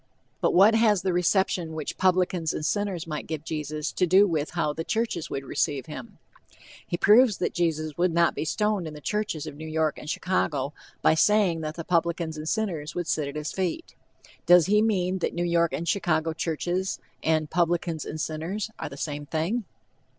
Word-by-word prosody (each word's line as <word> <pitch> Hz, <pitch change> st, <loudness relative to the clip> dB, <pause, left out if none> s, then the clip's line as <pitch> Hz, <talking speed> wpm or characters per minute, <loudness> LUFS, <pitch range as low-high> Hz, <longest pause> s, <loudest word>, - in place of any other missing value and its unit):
But -, -, +2 dB
what 200 Hz, +5 st, +7 dB
has 215 Hz, -5 st, +3 dB
the 185 Hz, -, +1 dB
reception 175 Hz, -2 st, +1 dB
which 155 Hz, -2 st, -4 dB
publicans 180 Hz, -3 st, +1 dB
and 150 Hz, -, -3 dB
sinners 200 Hz, -4 st, -1 dB
might 155 Hz, -2 st, -5 dB
give 155 Hz, -2 st, -4 dB
Jesus 155 Hz, -1 st, -3 dB
to 180 Hz, -, +1 dB
do 190 Hz, +4 st, +6 dB
with 160 Hz, -5 st, -1 dB
how 150 Hz, -3 st, +1 dB
the 165 Hz, -, -4 dB
churches 185 Hz, -5 st, -2 dB
would 135 Hz, 0 st, -4 dB
receive 140 Hz, -1 st, -1 dB
him? 130 Hz, -6 st, -9 dB, 0.7 s
He 175 Hz, -, -2 dB
proves 215 Hz, +3 st, +5 dB
that -, -, -1 dB
Jesus 155 Hz, -3 st, -1 dB
would 180 Hz, 0 st, +3 dB
not 170 Hz, 0 st, +3 dB
be -, -, -3 dB
stoned 210 Hz, +1 st, 0 dB
in 155 Hz, -, -8 dB
the -, -, -8 dB
churches 210 Hz, -3 st, -2 dB
of 155 Hz, -, -6 dB
New 155 Hz, +2 st, -8 dB
York 155 Hz, -1 st, 0 dB
and 150 Hz, -, -8 dB
Chicago 150 Hz, -6 st, -1 dB, 0.3 s
by -, -, +5 dB
saying 180 Hz, 0 st, +3 dB
that 155 Hz, 0 st, -4 dB
the 165 Hz, -, -5 dB
"publicans 170 Hz, -1 st, 0 dB
and 155 Hz, +1 st, -4 dB
sinners 170 Hz, -8 st, -2 dB
would 175 Hz, -, -2 dB
sit 155 Hz, -2 st, -1 dB
at 140 Hz, -, -7 dB
his 150 Hz, +1 st, -3 dB
feet." 190 Hz, -, -3 dB, 0.5 s
Does 175 Hz, -2 st, +7 dB
he 210 Hz, +3 st, +4 dB
mean 190 Hz, -4 st, +1 dB
that -, -, -2 dB
"New 175 Hz, 0 st, 0 dB
York 170 Hz, -1 st, +2 dB
and 170 Hz, -, -3 dB
Chicago 165 Hz, -4 st, +1 dB
churches" 175 Hz, +3 st, -2 dB, 0.2 s
and 155 Hz, -1 st, +1 dB
"publicans 170 Hz, -2 st, 0 dB
and 155 Hz, -, -6 dB
sinners" 170 Hz, +8 st, -3 dB
are -, -, -4 dB
the 140 Hz, -, -10 dB
same 145 Hz, 0 st, -4 dB
thing? 170 Hz, +9 st, -1 dB
170 Hz, 195 wpm, -26 LUFS, 155-185 Hz, 0.7 s, what